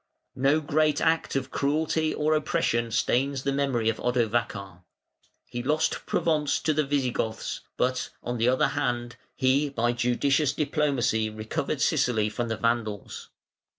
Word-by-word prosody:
No 140 +4 +2
great 150 0 +2
act 160 -2 +1
of 135 -1 -2
cruelty 155 +2 0
or 155 +1 +1
oppression 150 -7 0
stains 130 +4 0
the 140 - 0
memory 135 -5 0
of 115 - 0
Odovacar. 110 -6 -1 0.6
He 120 - -5
lost 155 +5 0
Provence 150 -3 +1
to 155 - +1
the 155 +1 +2
Visigoths, 130 -5 -2 0.2
but, 130 0 0
on 120 -1 -3
the 115 +2 +3
other 130 - +3
hand, 120 -4 -2 0.2
he 140 +2 +2
by 120 -3 0
judicious 130 +4 +1
diplomacy 140 -7 0
recovered 110 0 -3
Sicily 110 -4 +2
from 120 +2 -2
the 110 -1 -2
Vandals. 115 -3 -2
130 Hz, 140 wpm, -27 LUFS, 120-145 Hz, 0.6 s, the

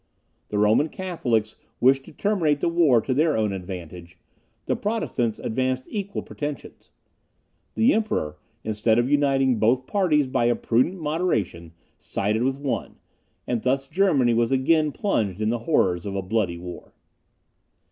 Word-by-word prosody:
The 105 - -2
Roman 110 +9 +3
Catholics 120 - -2 0.2
wished 135 +2 +3
to - - -12
terminate 170 -8 +1
the 170 - +1
war 160 -9 +4
to 130 - -1
their 155 +1 +2
own 105 -2 0
advantage; 90 -2 -8 0.5
the - - 0
Protestants 135 - -1
advanced 130 +2 -2
equal 200 -2 -4
pretensions. 145 -2 -7 0.9
The 235 +5 +4
Emperor, 80 - -1 0.2
instead 110 +1 +1
of 120 +1 +2
uniting 135 -4 +2
both 125 +4 +2
parties 165 -7 +2
by 130 -2 0
a 120 0 +3
prudent 130 +11 +1
moderation, 150 - -2 0.3
sided 105 +3 -1
with 135 +2 0
one; 140 -2 -3 0.5
and 120 -2 -1
thus 135 +3 0
Germany 145 -10 +2
was 115 +1 +1
again 150 +3 +2
plunged 110 - -1
in 110 0 0
the 120 - -1
horrors 90 - +2
of 100 - -4
a 95 - -2
bloody 95 -3 -1
war. 90 +1 -10
130 Hz, 145 wpm, -24 LUFS, 105-150 Hz, 0.9 s, war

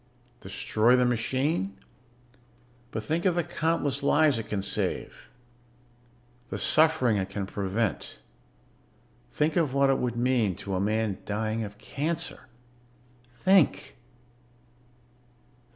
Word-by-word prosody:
"Destroy 110 +4 +1
the 125 0 +3
machine? 125 - -1 1.1
But 110 -2 -5
think 160 +8 -1
of 180 -3 +3
the 175 - +1
countless 150 -4 -1
lives 145 -2 +3
it 110 0 -7
can 100 -2 -2
save, - - -2 1.2
the - - -4
suffering 155 -8 +3
it 95 -1 -2
can 100 0 -4
prevent. 100 +1 -2 1.1
Think 150 +1 0
of 150 -6 +1
what 140 0 +4
it 135 - +1
would 120 -2 -2
mean 120 -6 +1
to 100 - -6
a 95 - 0
man 105 0 0
dying 110 +2 -2
of 105 0 -8
cancer. 150 +6 -4 0.8
Think 185 +6 +2
120 Hz, 115 wpm, -27 LUFS, 105-150 Hz, 1.2 s, what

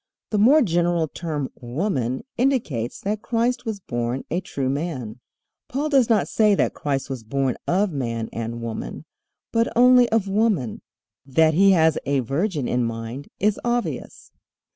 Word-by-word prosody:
The 210 - +1
more 275 +8 +6
general 175 -3 +1
term 150 -4 -4
"woman" 130 - -2
indicates 225 - 0
that 210 +1 -2
Christ 245 +2 0
was 220 -3 -3
born 120 -5 -3
a 175 +3 0
true 135 -7 -3
man. 130 -5 -3 0.5
Paul 290 +4 -2
does 270 -5 +4
not 220 -3 +3
say 215 -2 +3
that - - +1
Christ 135 -2 -2
was 130 -4 -6
born 130 +2 -1
of 190 +2 +2
man 115 -6 -3
and 115 +1 -4
woman, 115 -1 -5 0.5
but 230 0 +1
only 250 0 +6
of 220 -3 +1
woman. 195 - 0 0.4
That 155 +4 +3
he 195 +4 +5
has 160 -3 +3
a 140 -1 +2
virgin 145 - -1
in 125 0 +1
mind 115 +4 -5
is 210 +1 +1
obvious. 240 0 -3
160 Hz, 155 wpm, -23 LUFS, 130-215 Hz, 0.5 s, more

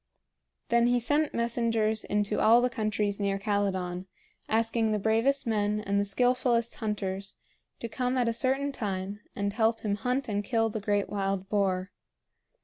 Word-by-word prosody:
Then 235 0 +4
he 245 0 +3
sent 290 +5 +1
messengers 230 -2 0
into 210 0 0
all 230 +2 +6
the 250 0 +1
countries 215 -3 -1
near 200 -1 0
Calydon, 190 -3 -1 0.4
asking 225 0 +1
the 215 - +1
bravest 225 +7 +1
men 210 -2 0
and 200 -1 0
skillfullest 245 +1 +1
hunters 195 -3 -3 0.5
to 230 - -3
come 250 +2 -1
at 245 -2 +2
a 230 - +1
certain 265 +4 0
time 200 -4 -4 0.2
and 200 0 -1
help 225 +1 +1
him 205 -2 -1
hunt 250 +5 -1
and 205 -2 -1
kill 225 0 +1
the 220 - -3
great 205 -1 0
wild 195 -1 -2
boar. 190 -2 0
215 Hz, 155 wpm, -28 LUFS, 200-235 Hz, 0.5 s, all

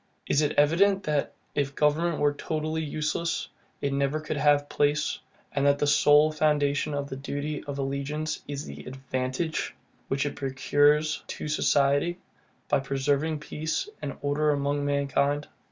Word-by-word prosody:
It - - -1
is 150 - +1
evident, 190 +7 +4
that, 150 -2 -1 0.2
if 140 -1 -1
government 155 +2 +2
were 145 0 +2
totally 155 +2 -2
useless, 155 +2 -2 0.3
it 140 -1 0
never 140 +2 0
could 155 0 -4
have 145 0 +3
place, 145 +1 +1 0.3
and 140 - 0
that 140 0 +4
the 145 - +1
sole 150 +1 +5
foundation 150 -1 +1
of 140 0 -2
the 135 - -6
duty 145 +2 -4
of 140 -1 -5
allegiance 140 +3 -2
is 145 +1 -4
the - - -9
ADVANTAGE, 130 +4 -3 0.3
which 135 +1 0
it 145 - -3
procures 145 +3 +2
to - - -5
society, 145 +2 +2 0.5
by 145 - +3
preserving 140 +3 0
peace 160 - -3
and 140 - -5
order 145 +2 +1
among 145 0 0
mankind. 140 0 +1
145 Hz, 150 wpm, -27 LUFS, 140-150 Hz, 0.5 s, sole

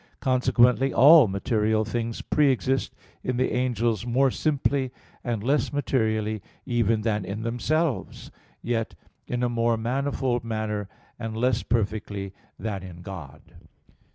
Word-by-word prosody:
Consequently, 125 0 +3
all 145 0 +8
material 110 +2 0
things 115 +1 -3
pre 150 -2 +3
exist 135 +1 0 0.3
in 125 -1 -1
the 130 - +1
angels 120 -4 0
more 130 +3 +2
simply 140 -3 0 0.3
and 115 -4 -2
less 140 +5 +1
materially 110 -7 0 0.2
even 115 -3 +1
than 105 -2 0
in 100 +4 -5
themselves, 140 +6 -1 0.3
yet 115 -1 -2 0.3
in 125 0 -2
a - - +3
more 115 -1 +1
manifold 125 +1 -1
manner 110 -3 -3 0.3
and 115 -1 -4
less 125 0 +1
perfectly 100 -3 -2 0.2
than 105 -4 -4
in 90 -2 -10
God. 80 -7 -9
115 Hz, 125 wpm, -25 LUFS, 110-130 Hz, 0.3 s, all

